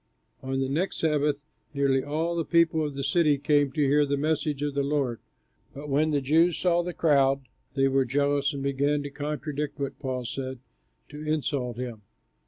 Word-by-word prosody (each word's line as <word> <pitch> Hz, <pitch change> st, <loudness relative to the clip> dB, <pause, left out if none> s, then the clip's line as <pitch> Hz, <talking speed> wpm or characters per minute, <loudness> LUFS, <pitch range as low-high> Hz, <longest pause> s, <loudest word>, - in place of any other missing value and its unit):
On 135 Hz, 0 st, -2 dB
the 135 Hz, -, 0 dB
next 160 Hz, +8 st, -1 dB
Sabbath 150 Hz, -2 st, +1 dB, 0.4 s
nearly 135 Hz, -1 st, +2 dB
all 160 Hz, +4 st, -1 dB
the 165 Hz, -, 0 dB
people 165 Hz, -1 st, +3 dB
of 145 Hz, -2 st, -4 dB
the 140 Hz, -, -3 dB
city 150 Hz, 0 st, +3 dB
came 145 Hz, 0 st, +2 dB
to 150 Hz, -, -1 dB
hear 145 Hz, +1 st, +4 dB
the 140 Hz, 0 st, 0 dB
message 150 Hz, -1 st, -1 dB
of 145 Hz, -1 st, -1 dB
the 140 Hz, -, 0 dB
Lord. 140 Hz, -4 st, -1 dB, 0.6 s
But 145 Hz, +2 st, -7 dB
when 150 Hz, +3 st, +2 dB
the 145 Hz, -2 st, +1 dB
Jews 160 Hz, +5 st, +3 dB
saw 175 Hz, -1 st, +2 dB
the 180 Hz, +1 st, -4 dB
crowd, 140 Hz, -5 st, +3 dB, 0.3 s
they 135 Hz, -1 st, +3 dB
were 135 Hz, 0 st, +3 dB
jealous 140 Hz, +2 st, +1 dB
and 140 Hz, -2 st, -5 dB
began 140 Hz, +1 st, +1 dB
to 145 Hz, -, -6 dB
contradict 150 Hz, 0 st, -4 dB
what 140 Hz, -1 st, -4 dB
Paul 130 Hz, -2 st, -3 dB
said, 130 Hz, +2 st, -4 dB
and -, -, -27 dB, 0.7 s
to -, -, +1 dB
insult 135 Hz, -6 st, -1 dB
him. 120 Hz, -4 st, -5 dB
145 Hz, 190 wpm, -27 LUFS, 135-150 Hz, 0.7 s, hear